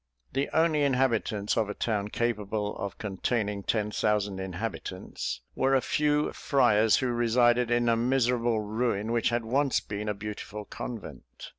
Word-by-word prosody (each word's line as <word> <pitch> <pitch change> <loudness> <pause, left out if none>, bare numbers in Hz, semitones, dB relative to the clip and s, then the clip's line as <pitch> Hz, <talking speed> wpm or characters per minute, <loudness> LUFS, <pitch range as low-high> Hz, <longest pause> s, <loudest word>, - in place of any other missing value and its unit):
The 135 - 0
only 160 -2 +3
inhabitants 120 -6 +1
of 110 -3 +1
a 105 - -4
town 105 -3 -1
capable 105 -2 -2
of 100 -2 -5
containing 105 0 -2
ten 105 +1 -1
thousand 105 -2 0
inhabitants, 95 - -5
were 135 +1 +2
a - - +5
few 150 +1 +1
friars 110 -6 +3
who 130 -2 0
resided 120 0 +3
in 120 0 +2
a 115 - +4
miserable 120 -2 +1
ruin 110 0 -1
which 115 -2 +2
had 120 -1 -1
once 135 +3 +2
been 105 +1 -5
a 105 - -1
beautiful 105 0 -6
convent. 115 -1 -8
115 Hz, 150 wpm, -28 LUFS, 105-125 Hz, -, a